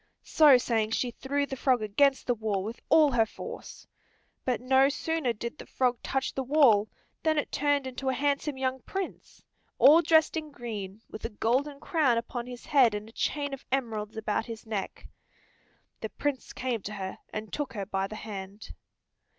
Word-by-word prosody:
So 295 -5 +6
saying 225 -3 0
she 245 0 0
threw 280 +3 -1
the 270 - -5
frog 255 -3 +2
against 270 +6 +2
the 245 - +2
wall 210 -4 -2
with 225 +4 -6
all 310 -2 +6
her 230 -3 +3
force. - - -9 0.6
But 250 -2 0
no 265 +2 +4
sooner 320 -2 -1
did 235 +4 -6
the - - -10
frog 250 -2 0
touch 270 0 -2
the 270 - -2
wall 255 -7 +4 0.3
than 315 -1 +1
it 295 - -1
turned 285 -1 +1
into 260 +1 -3
a 260 - 0
handsome 285 0 0
young 260 0 -1
prince, 385 -1 -6 0.3
all 310 +4 +8
dressed 320 -1 +4
in 310 -1 -3
green, 220 -6 -7
with 215 - -10
a - - -2
golden 260 +7 0
crown 295 -10 +2
upon 235 +1 -4
his 245 -1 -9
head, 255 -7 +4
and 210 +1 -6
a - - -15
chain 285 +4 -2
of 275 - -7
emeralds 225 -5 -2
about 220 +1 -1
his 230 0 -8
neck. 210 -3 -5 0.9
The - - -4
Prince 285 -3 -3
came 245 -4 -2
to 210 - -6
her, 190 -2 -5
and 215 0 -6
took 290 -4 -3
her 200 -3 -4
by 195 -1 -1
the 215 - -8
hand. 200 -1 -8
250 Hz, 185 wpm, -28 LUFS, 220-280 Hz, 0.9 s, all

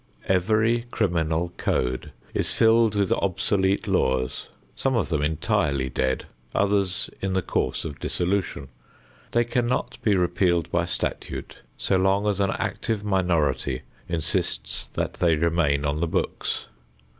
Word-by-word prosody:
Every 110 +5 +2
criminal 85 -5 0
code 65 0 -1 0.2
is - - 0
filled 115 -1 +4
with 100 -2 +1
obsolete 95 +1 +1
laws, 65 -1 0 0.3
some 135 -1 0
of 115 - +1
them 80 -4 0
entirely 75 - +1
dead, 65 +1 -1 0.3
others 100 -2 +1
in 95 -1 -1
the 95 -1 +1
course - - -1
of 75 -3 -6
dissolution. 90 -6 -1 0.6
They 120 - +3
cannot 120 +1 -1
be 105 -3 +3
repealed 90 -2 +1
by - - +2
statute - - -4 0.2
so 95 - +2
long 95 +2 +2
as 100 -2 +1
an 100 -1 +2
active 105 +2 -2
minority 85 -9 +1 0.3
insists 85 -2 -1
that - - -2
they 85 -2 +3
remain 75 -3 +1
on 75 +1 0
the 85 - +1
books. - - -2
90 Hz, 135 wpm, -25 LUFS, 80-100 Hz, 0.6 s, filled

